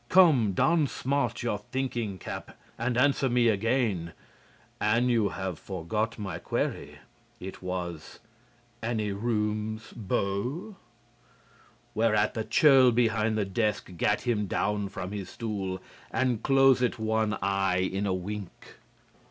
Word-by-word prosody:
Come, 145 Hz, -, +5 dB
don 160 Hz, -, +3 dB
smart 125 Hz, -2 st, -1 dB
your 110 Hz, -4 st, -1 dB
thinking 120 Hz, -3 st, -3 dB
cap -, -, -7 dB, 0.2 s
and 120 Hz, +1 st, -1 dB
answer 135 Hz, 0 st, +3 dB
me 120 Hz, -1 st, +3 dB
again. 110 Hz, -5 st, 0 dB, 0.7 s
An' 115 Hz, +4 st, +2 dB
you 115 Hz, -4 st, +2 dB
have 95 Hz, -4 st, -4 dB
forgot 100 Hz, +5 st, -3 dB
my 95 Hz, -6 st, -5 dB
query; -, -, -3 dB, 0.4 s
it 95 Hz, +1 st, -8 dB
was: 90 Hz, -3 st, -5 dB, 0.6 s
'Any 110 Hz, -2 st, -1 dB
rooms, 110 Hz, 0 st, -2 dB
bo?'" 120 Hz, -, -2 dB, 1.2 s
Whereat 110 Hz, -1 st, +2 dB
the 110 Hz, -, -2 dB
churl 130 Hz, +3 st, +6 dB
behind 110 Hz, -2 st, +2 dB
the 105 Hz, -, +1 dB
desk 105 Hz, 0 st, -1 dB
gat 105 Hz, +5 st, +1 dB
him 110 Hz, -5 st, 0 dB
down 105 Hz, +1 st, -1 dB
from 95 Hz, -1 st, -6 dB
his 100 Hz, -3 st, -5 dB
stool 100 Hz, -5 st, -4 dB, 0.3 s
and 125 Hz, -4 st, 0 dB
closed 135 Hz, -2 st, +4 dB
one 110 Hz, -1 st, 0 dB
eye 95 Hz, -1 st, +1 dB
in 100 Hz, +1 st, -1 dB
a 95 Hz, -, +1 dB
wink. 100 Hz, +1 st, -7 dB
110 Hz, 125 wpm, -28 LUFS, 100-120 Hz, 1.2 s, churl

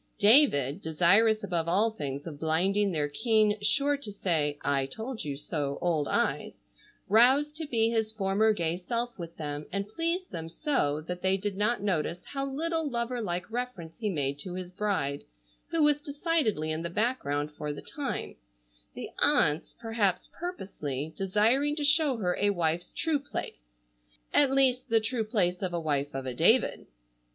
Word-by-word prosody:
David, 205 Hz, -, +5 dB
desirous 200 Hz, +8 st, +3 dB
above 170 Hz, -4 st, -1 dB
all 205 Hz, +6 st, +3 dB
things 140 Hz, -8 st, -5 dB
of 150 Hz, -4 st, -8 dB
blinding 190 Hz, +6 st, +1 dB
their 150 Hz, -4 st, 0 dB
keen, 215 Hz, +5 st, +2 dB
sure 280 Hz, +7 st, +2 dB
to 250 Hz, -7 st, -6 dB
say 160 Hz, -7 st, 0 dB
"I 135 Hz, -1 st, +1 dB
told 220 Hz, -, -6 dB
you 145 Hz, -3 st, -4 dB
so" 145 Hz, -1 st, -3 dB
old 160 Hz, -5 st, 0 dB
eyes, -, -, -1 dB, 0.4 s
roused 265 Hz, +8 st, +4 dB
to 320 Hz, -2 st, -3 dB
be 230 Hz, -4 st, +1 dB
his 220 Hz, -2 st, 0 dB
former 215 Hz, +1 st, +2 dB
gay 170 Hz, -4 st, -1 dB
self 235 Hz, +5 st, -3 dB
with 170 Hz, -1 st, -8 dB
them, 150 Hz, -1 st, -5 dB
and 200 Hz, +1 st, -2 dB
pleased 335 Hz, -, -2 dB
them 165 Hz, -2 st, -5 dB
so 165 Hz, -, 0 dB
that 180 Hz, +3 st, -6 dB
they 190 Hz, +1 st, +2 dB
did 200 Hz, 0 st, -3 dB
not 210 Hz, +2 st, 0 dB
notice 175 Hz, -3 st, -1 dB
how 275 Hz, -1 st, -3 dB
little 320 Hz, +3 st, -2 dB
lover 240 Hz, 0 st, -2 dB
like 180 Hz, 0 st, -3 dB
reference 240 Hz, -9 st, -5 dB
he 215 Hz, -2 st, -1 dB
made 140 Hz, -5 st, -1 dB
to 180 Hz, +4 st, -5 dB
his 180 Hz, -1 st, -6 dB
bride, 180 Hz, -8 st, -2 dB, 0.5 s
who 330 Hz, -2 st, +1 dB
was 295 Hz, -1 st, +3 dB
decidedly 285 Hz, -, 0 dB
in 155 Hz, +1 st, -2 dB
the 170 Hz, -, -3 dB
background 160 Hz, -, -1 dB
for 150 Hz, 0 st, -5 dB
the 145 Hz, -, -8 dB
time, 280 Hz, -4 st, -4 dB, 0.6 s
the -, -, -7 dB
aunts, 150 Hz, +2 st, +2 dB
perhaps 215 Hz, -5 st, -1 dB
purposely, 160 Hz, -, -5 dB
desiring 225 Hz, +10 st, +2 dB
to 300 Hz, -, -2 dB
show 295 Hz, -3 st, +4 dB
her 180 Hz, -5 st, 0 dB
a 205 Hz, -, +3 dB
wife's 175 Hz, -2 st, -1 dB
true 320 Hz, -3 st, 0 dB
place,—at -, -, -3 dB
least 260 Hz, -2 st, +2 dB
the 225 Hz, 0 st, +4 dB
true 225 Hz, +1 st, -1 dB
place 185 Hz, -5 st, 0 dB
of 180 Hz, -2 st, -2 dB
a -, -, 0 dB
wife 145 Hz, -3 st, -2 dB
of 135 Hz, 0 st, -4 dB
a 130 Hz, -, -3 dB
David. -, -, +2 dB
195 Hz, 170 wpm, -29 LUFS, 155-240 Hz, 0.6 s, David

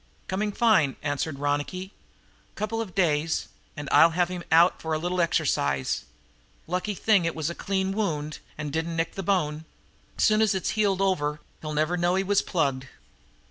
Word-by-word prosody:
"Coming 205 Hz, +3 st, -1 dB
fine," 200 Hz, -, +3 dB
answered 145 Hz, 0 st, -2 dB
Ronicky. 145 Hz, +7 st, -2 dB, 0.6 s
"Couple 215 Hz, +2 st, -2 dB
of 200 Hz, -5 st, -7 dB
days 160 Hz, -4 st, +1 dB, 0.3 s
and 145 Hz, 0 st, -5 dB
I'll 150 Hz, +3 st, +7 dB
have 175 Hz, -1 st, +2 dB
him 180 Hz, -1 st, -5 dB
out 170 Hz, +3 st, +5 dB
for 160 Hz, 0 st, -2 dB
a -, -, +1 dB
little 175 Hz, +3 st, -1 dB
exercise. 70 Hz, -, 0 dB, 0.6 s
Lucky 185 Hz, +4 st, -2 dB
thing 205 Hz, -2 st, +3 dB
it 165 Hz, 0 st, -1 dB
was 160 Hz, +1 st, -2 dB
a -, -, -5 dB
clean 190 Hz, +1 st, -1 dB
wound 155 Hz, -8 st, -2 dB, 0.2 s
and 150 Hz, -2 st, -5 dB
didn't 165 Hz, +1 st, -2 dB
nick 165 Hz, 0 st, -1 dB
the 195 Hz, -, -4 dB
bone. 160 Hz, -5 st, 0 dB, 0.5 s
Soon 215 Hz, -1 st, +4 dB
as 215 Hz, -3 st, +3 dB
it's 190 Hz, -, -1 dB
healed 200 Hz, -3 st, +1 dB
over 150 Hz, -6 st, 0 dB, 0.2 s
he'll 155 Hz, -1 st, -5 dB
never 155 Hz, +4 st, +1 dB
know 175 Hz, +1 st, +2 dB
he 190 Hz, -, +1 dB
was 200 Hz, +1 st, +2 dB
plugged." 135 Hz, -6 st, -1 dB
170 Hz, 175 wpm, -26 LUFS, 150-195 Hz, 0.6 s, I'll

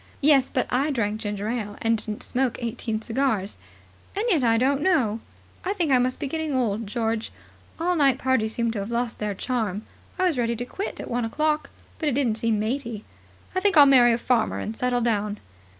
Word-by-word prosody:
"Yes, 275 Hz, -2 st, +5 dB
but 255 Hz, -, 0 dB
I 270 Hz, +5 st, +2 dB
drank 220 Hz, -5 st, -1 dB
ginger 205 Hz, -1 st, -3 dB
ale, 215 Hz, -3 st, -3 dB
and 225 Hz, 0 st, +2 dB
didn't 210 Hz, -1 st, -5 dB
smoke 255 Hz, -1 st, -1 dB
eighteen 225 Hz, -2 st, -3 dB
cigars. 225 Hz, -5 st, -1 dB, 0.6 s
And 415 Hz, +3 st, -1 dB
yet, 325 Hz, -, +3 dB
I 230 Hz, -1 st, +4 dB
don't 270 Hz, +4 st, +2 dB
know. 255 Hz, -, +2 dB, 0.4 s
I 385 Hz, -, 0 dB
think 345 Hz, -8 st, 0 dB
I 255 Hz, -, +5 dB
must 255 Hz, +1 st, 0 dB
be 295 Hz, -, -2 dB
getting 315 Hz, 0 st, -2 dB
old, 225 Hz, -4 st, 0 dB
George. 225 Hz, 0 st, -2 dB, 0.5 s
All 355 Hz, +2 st, +1 dB
night 275 Hz, -5 st, +4 dB
parties 230 Hz, -5 st, 0 dB
seem 235 Hz, -1 st, 0 dB
to 220 Hz, -, -3 dB
have 200 Hz, +2 st, -4 dB
lost 235 Hz, 0 st, -2 dB
their 210 Hz, -1 st, -2 dB
charm. 220 Hz, -3 st, -2 dB, 0.3 s
I 370 Hz, -, 0 dB
was 325 Hz, -8 st, +1 dB
ready 235 Hz, 0 st, +1 dB
to 245 Hz, +2 st, -4 dB
quit 390 Hz, +10 st, -5 dB
at -, -, -6 dB
one 245 Hz, 0 st, -1 dB
o'clock, 305 Hz, +6 st, 0 dB, 0.3 s
but 310 Hz, -, +1 dB
it -, -, -1 dB
didn't 235 Hz, -6 st, +1 dB
seem 225 Hz, -1 st, +1 dB
matey. 230 Hz, -1 st, -3 dB, 0.5 s
I 370 Hz, -, +1 dB
think 395 Hz, -3 st, +2 dB
I'll 290 Hz, -, +10 dB
marry 250 Hz, -3 st, +6 dB
a 230 Hz, -, +2 dB
farmer 235 Hz, -1 st, +1 dB
and 220 Hz, -, -4 dB
settle 245 Hz, +1 st, 0 dB
down." 210 Hz, -3 st, 0 dB
240 Hz, 210 wpm, -25 LUFS, 220-275 Hz, 0.6 s, I'll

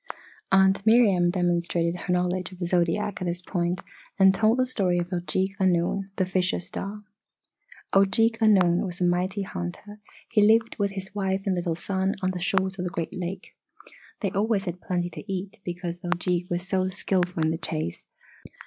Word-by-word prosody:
Aunt 190 Hz, +1 st, +4 dB
Miriam 210 Hz, -6 st, +5 dB
demonstrated 175 Hz, -1 st, 0 dB
her 180 Hz, -, -3 dB
knowledge 180 Hz, 0 st, -1 dB
of 185 Hz, -, -11 dB
the 175 Hz, -, -3 dB
zodiac 180 Hz, +4 st, 0 dB
at -, -, -2 dB
this 175 Hz, +1 st, 0 dB
point 175 Hz, -1 st, -1 dB, 0.4 s
and 190 Hz, -1 st, +6 dB
told 220 Hz, +4 st, +3 dB
the 255 Hz, -, +3 dB
story 195 Hz, -8 st, +1 dB
of 175 Hz, +1 st, -2 dB
Ojeeg 190 Hz, +2 st, 0 dB
Annung, 185 Hz, +1 st, +1 dB
the 190 Hz, -, +1 dB
Fisher 185 Hz, 0 st, +1 dB
Star. 200 Hz, +4 st, -5 dB, 0.9 s
"Ojeeg 225 Hz, +4 st, +4 dB
Annung 185 Hz, -5 st, +4 dB
was 180 Hz, -2 st, -4 dB
a -, -, 0 dB
mighty 185 Hz, +3 st, 0 dB
hunter 185 Hz, -, -7 dB, 0.3 s
he 220 Hz, -3 st, +4 dB
lived 225 Hz, +2 st, +4 dB
with 200 Hz, -1 st, 0 dB
his 190 Hz, 0 st, -7 dB
wife 195 Hz, -1 st, -1 dB
and 195 Hz, -, +1 dB
little 175 Hz, -2 st, -1 dB
son 190 Hz, +2 st, -1 dB
on 185 Hz, -, +1 dB
the 180 Hz, -, -5 dB
shores 190 Hz, +1 st, 0 dB
of 180 Hz, -, -2 dB
a -, -, -2 dB
great 170 Hz, -3 st, -4 dB
lake. 185 Hz, +1 st, -6 dB, 0.7 s
They 200 Hz, -, -1 dB
always 205 Hz, 0 st, 0 dB
had 180 Hz, -1 st, -5 dB
plenty 175 Hz, -1 st, -2 dB
to 195 Hz, -, -8 dB
eat 190 Hz, +1 st, -5 dB
because 175 Hz, 0 st, -5 dB
Ojeeg 175 Hz, 0 st, -1 dB
was 175 Hz, +1 st, -2 dB
so 185 Hz, -1 st, +1 dB
skilful 180 Hz, -3 st, 0 dB
in 160 Hz, -, +2 dB
the 160 Hz, -, -3 dB
chase. 155 Hz, -, -3 dB
185 Hz, 180 wpm, -26 LUFS, 175-195 Hz, 0.9 s, and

